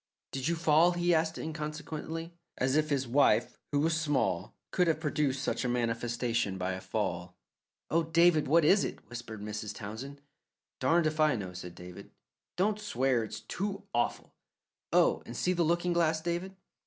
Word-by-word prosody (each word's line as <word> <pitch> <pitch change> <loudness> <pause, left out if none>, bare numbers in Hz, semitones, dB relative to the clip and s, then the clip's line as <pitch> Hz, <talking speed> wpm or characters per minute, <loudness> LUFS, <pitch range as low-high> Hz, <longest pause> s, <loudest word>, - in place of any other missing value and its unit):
"Did 135 -1 -2
you 170 - +1
fall?" 165 +1 +4
he 175 0 +2
asked 160 0 +1
inconsequently, 160 +1 -5 0.2
as 130 +2 +1
if 155 0 +2
his 135 -3 0
wife, 140 +4 +3
who 145 - +2
was 160 +1 +1
small, 145 -4 0 0.2
could 180 - +2
have 160 -2 +2
produced 145 -3 0
such - - -1
a 125 - 0
manifestation 120 -3 -1
by 90 0 -1
a 95 - -6
fall. - - -3 0.5
"Oh, 165 - +4
David, 165 0 +4
what 160 +2 +4
is 195 +6 +5
it?" - - -6
whispered 115 -3 -7
Mrs. 105 0 -5
Townsend. 115 +7 -7 0.6
"Darned 160 +5 +3
if 155 0 -1
I 155 -3 +4
know!" 95 -5 -5
said 90 -1 -8
David. 90 0 -10 0.5
"Don't 205 +3 +1
swear. 130 - +1
It's 110 - -7
too 195 - -4
awful. 120 - -1 0.6
Oh, - - +4
see 180 +9 0
the 175 - 0
looking 175 +2 +2
glass, 165 -2 +2
David!" 175 +3 -3
150 Hz, 165 wpm, -31 LUFS, 120-165 Hz, 0.6 s, is